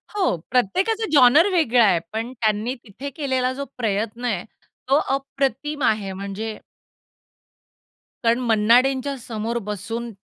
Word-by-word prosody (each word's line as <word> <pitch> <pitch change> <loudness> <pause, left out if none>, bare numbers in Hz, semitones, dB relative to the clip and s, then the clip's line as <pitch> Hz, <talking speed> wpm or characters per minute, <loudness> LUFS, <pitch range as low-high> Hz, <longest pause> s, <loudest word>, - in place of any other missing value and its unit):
हो, 380 - +2 0.2
प्रत्येकाचा 375 - +1
जॉनर 290 +4 +6
वेगळा 250 -9 +4
आहे. 180 -5 +3
पण 225 +3 -3
त्यांनी 220 +1 -1
तिथे 250 +7 -8
केलेला 260 -3 0
जो 280 +2 -5
प्रयत्न 225 +1 -2
आहे 205 -7 -1 0.5
तो 270 - +5 0.2
अप्रतिम 275 +1 -2
आहे 210 -3 +1
म्हणजे 200 +3 -5 1.7
कारण 235 +1 +3
मन्ना 230 -1 +4
डेंच्या 270 +1 -2
समोर 230 -1 -4
बसून 225 +4 -4
240 Hz, 125 wpm, -22 LUFS, 215-275 Hz, 1.7 s, जॉनर